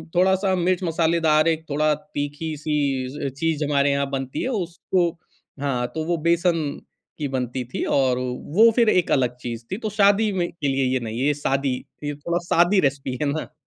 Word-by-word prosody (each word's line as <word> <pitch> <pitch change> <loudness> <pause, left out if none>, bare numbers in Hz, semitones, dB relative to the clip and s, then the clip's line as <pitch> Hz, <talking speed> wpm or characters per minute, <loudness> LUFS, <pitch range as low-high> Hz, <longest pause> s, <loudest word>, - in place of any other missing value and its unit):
थोड़ा-सा 190 +1 +3
मिर्च-मसालेदार 165 -3 +2
एक 160 -1 0
थोड़ा 150 +1 +2 0.2
तीखी-सी 145 -2 -2
चीज़ 155 +3 -1
हमारे 140 -1 +2
यहाँ 140 0 +1
बनती 135 -1 -3
है - - -1
उसको 180 -4 0 0.5
हाँ, 125 -4 0
तो 160 - -1
वो 170 0 0
बेसन 170 0 +2 0.6
की 150 - -2
बनती 130 -1 -3
थी - - -2
और 130 -3 +2
अ - - -2 0.4
वो 230 +1 +9
फिर 235 -3 +4
एक 180 -4 +2
अलग 125 -2 +2
चीज़ 120 -1 -6
थी 190 - -1
तो - - 0
शादी 205 +1 +4
में 175 -2 0
के 160 -4 -3
लिए 135 -1 +1
ये 130 - +1
नहीं, 115 0 -5
ये 145 +3 +2
शादी 135 -2 0 0.3
ये 145 0 -3
थोड़ा 170 +4 -2
सादी 175 +4 +4
रेसिपी 135 -2 -4
है - - +1
ना। 155 - -4
150 Hz, 180 wpm, -23 LUFS, 135-175 Hz, 0.6 s, वो